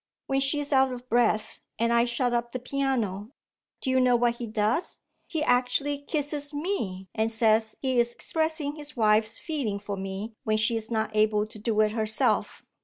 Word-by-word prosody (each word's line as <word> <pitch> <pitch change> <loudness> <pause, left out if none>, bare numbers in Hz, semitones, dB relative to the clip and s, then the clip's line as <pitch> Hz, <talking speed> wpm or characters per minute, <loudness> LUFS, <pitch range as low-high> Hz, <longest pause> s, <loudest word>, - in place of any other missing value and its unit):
When 270 0 0
she 275 +2 +2
is 290 0 -2
out 265 -1 +4
of 250 0 -8
breath, 230 -2 +1 0.2
and 235 +1 +1
I 235 0 +4
shut 245 0 0
up 235 0 -1
the 255 - -2
piano, 250 -5 -2 0.5
do 260 - 0
you 260 - +3
know 250 -1 +4
what 240 0 +2
he 235 - -5
does? 215 - 0 0.3
He 315 -3 -2
actually 255 +3 +1
kisses 290 0 -3
Me 230 - -3
and 225 0 0
says 220 -1 +2
he 260 -2 +2
is 235 0 +2
expressing 315 +1 -1
his 295 -2 -6
wife's 215 0 +3
feeling 275 -11 -3
for 200 0 -5
me 195 +3 -5
when 215 0 +1
she 215 +2 +2
is 225 -1 -3
not 220 -2 -1
able 215 0 +3
to 215 0 -10
do 215 0 -1
it 215 0 +2
herself! 220 -1 +1
235 Hz, 190 wpm, -27 LUFS, 215-270 Hz, 0.5 s, out